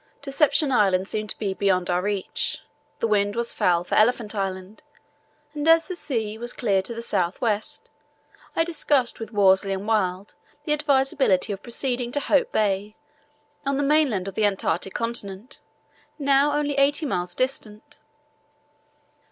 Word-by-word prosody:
Deception 285 +1 +2
Island 195 -5 +3
seemed 215 0 -4
to - - -5
be 200 -3 -2
beyond 190 -2 +1
our 175 0 +1
reach. 200 -1 -2 0.4
The - - 0
wind 205 -1 +1
was 235 0 -1
foul 175 -1 +2
for - - -7
Elephant 225 -1 +3
Island, 195 0 -4 0.7
and 295 +1 -3
as 330 0 +5
the 365 - -4
sea 220 -9 -3
was 240 +1 -2
clear 200 -5 +1
to 235 +5 -5
the 230 - -6
south 180 -5 -1
west; 215 -4 -2 0.6
I 330 - +3
discussed 295 -6 0
with 225 - -7
Worsley 195 -1 +3
and 195 +2 -5
Wild 195 -3 0 0.3
the 300 - 0
advisability 270 -9 +2
of 195 - -8
proceeding 245 0 -2
to 290 - +1
Hope 480 +10 +1
Bay 205 0 0 0.7
on 275 -1 0
the 285 - 0
mainland 275 -10 +2
of 195 - -5
the 215 - -1
Antarctic 195 -2 -1
Continent, 230 -1 -3 0.6
now 280 0 +3
only 290 -1 -1
eighty 290 +3 +2
miles 180 -9 -2
distant. 255 0 -3
220 Hz, 155 wpm, -24 LUFS, 195-275 Hz, 0.7 s, as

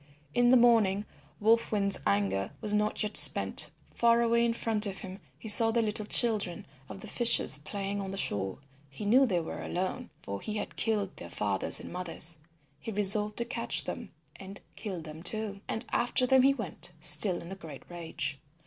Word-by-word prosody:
In 245 0 +2
the 255 - +6
morning 220 -4 +2 0.3
Wolf 225 +2 +1
Wind's 200 -2 +2
anger 100 -1 -1
was 210 - -2
not 210 +1 -1
yet 210 - -5
spent. - - +4 0.2
Far 235 0 +2
away 235 0 +1
in 235 -1 0
front 220 -2 -1
of 195 -1 -6
him 190 +1 -9 0.2
he - - -11
saw 225 +2 +6
the 230 0 0
little 210 -1 -4
children 215 -8 +3 0.2
of 195 - -10
the 215 - -10
fishers 235 - 0
playing 200 +6 -5
on 195 - -6
the 195 - -7
shore. 95 - -2 0.3
He 135 +9 -9
knew 255 +6 +4
they 180 -6 0
were 160 - -7
alone, 190 +8 -5
for 100 0 -7
he 215 - -6
had - - -6
killed 210 -4 -2
their 85 - -10
fathers 100 +1 +1
and - - -10
mothers. 170 -2 -1 0.4
He 225 - -7
resolved 210 +1 +3
to 235 - -1
catch 235 -1 -1
them 235 -5 -7 0.3
and 195 +1 -10 0.2
kill 190 -6 -7
them 155 0 -11
too, 210 +1 0
and 220 - -5
after 245 +1 +1
them 265 +1 +4
he 275 +1 +3
went, 185 - -7
still 155 +5 +6
in 170 - -11
a - - -6
great 155 -7 -12
rage. 160 -5 -5
205 Hz, 195 wpm, -28 LUFS, 175-230 Hz, 0.4 s, the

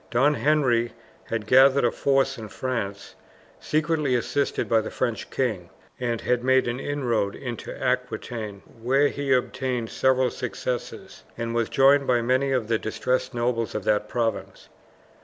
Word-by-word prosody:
Don 135 +5 +3
Henry 125 -3 +2 0.3
had 115 -2 -3
gathered 130 +3 +5
a 120 - +3
force 135 -1 +1
in 110 -1 -8
France, 100 -5 -4 0.5
secretly 155 -3 0
assisted 140 +4 -1
by 115 -1 +3
the 110 - -5
French 120 -3 -3
king, 105 -10 -2 0.3
and 120 -2 -2
had 125 -1 0
made 130 0 +3
an 120 +2 -2
inroad 120 -9 -1
into 120 -3 -6
Aquitaine, 120 -5 -3 0.2
where 135 +4 +3
he 140 -1 -3
obtained 125 -2 0
several 130 -1 +2
successes, 125 0 -5
and 115 0 -3
was 115 -1 0
joined 140 +1 +4
by 120 -2 +2
many 130 +3 +1
of 125 -5 0
the 115 -1 +1
disinterested 125 +3 -2
nobles 120 -2 -1
of 105 - -2
that 105 +1 +1
province. 115 -2 -3
125 Hz, 150 wpm, -25 LUFS, 115-135 Hz, 0.5 s, gathered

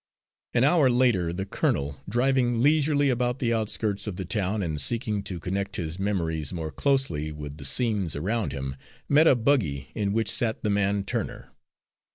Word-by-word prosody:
An 120 - +4
hour 145 -1 +5
later 120 -9 +2
the 95 +3 -3
colonel, 70 -7 -1
driving 120 0 +2
leisurely 145 -1 +3
about 125 0 0
the 120 -3 0
outskirts 110 -2 -1
of 100 - -3
the 95 - -5
town 100 +1 -1
and 80 -4 -2
seeking 110 - -1
to 90 -4 -4
connect 95 +4 -3
his 85 0 -4
memories 85 -7 -1
more 80 -3 -4
closely 135 - 0
with 75 -1 -8
the 70 - -7
scenes 105 - +1
around 105 +9 -1
him, 65 -1 -4 0.3
met 155 +3 +5
a 135 - +6
buggy 110 - 0
in 100 -2 -1
which 110 +1 0
sat 115 -2 -1
the 105 - +1
man 100 0 +1
Turner. - - -4
100 Hz, 175 wpm, -26 LUFS, 85-120 Hz, 0.3 s, a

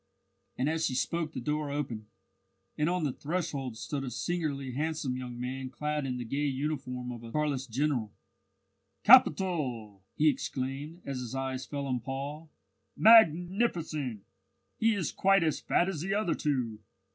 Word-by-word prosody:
And 130 - +1
as 160 +1 +1
she 130 - -3
spoke 160 +4 -1
the - - -5
door 150 -1 -2
opened, 125 -7 -4 0.7
and 150 +2 +1
on 180 -1 0
the 140 -4 0
threshold 140 -7 -3
stood 140 +4 -4
a 130 - -3
singularly 140 +2 -2
handsome 150 -1 -2
young 125 -1 -6
man 130 +1 -4
clad 150 +1 -2
in 125 -1 -2
the 120 - -4
gay 140 +5 -1
uniform 130 -3 -3
of 120 -2 -7
a 115 -1 -9
Carlist 140 -3 -1
general. 125 -3 0 0.9
"Capital!" 125 - +4
he 155 - +3
exclaimed, 145 +4 -2
as 135 -2 -3
his 125 +1 -5
eyes 130 -1 -3
fell 140 -1 -3
on 130 -2 -1
Paul. 140 +5 -5 0.5
"Magnificent! 175 - +4 0.6
He 225 -1 +3
is 180 -8 -1
quite 195 -1 +4
as 155 -3 +1
fat 175 - +2
as 180 -6 -3
the 195 +3 -1
other 205 -5 +1
two. 125 -7 -1
140 Hz, 160 wpm, -30 LUFS, 125-160 Hz, 0.9 s, Capital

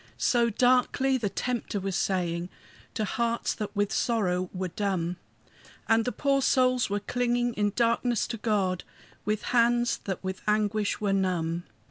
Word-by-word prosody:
So 235 -2 +3
darkly 255 +3 +3
the 210 -4 -1
Tempter 240 -2 -2
was 195 -1 -3
saying, 175 -2 -1 0.5
To 215 - 0
hearts 235 +2 -1
that 210 0 -6
with 205 0 0
sorrow 185 -6 0
were 185 -1 -3
dumb; 180 -3 -2 0.7
And 225 0 +3
the 250 - 0
poor 275 0 +1
souls 255 -3 +3
were 205 +1 0
clinging 240 +2 0
in 205 -2 0
darkness 235 0 +2
to 235 - -3
God, 200 -5 0 0.4
With 210 +1 -1
hands 240 0 +3
that 190 -2 -4
with 190 0 -4
anguish 210 0 +1
were 200 -2 +1
numb. 175 -3 0
210 Hz, 150 wpm, -28 LUFS, 190-240 Hz, 0.7 s, So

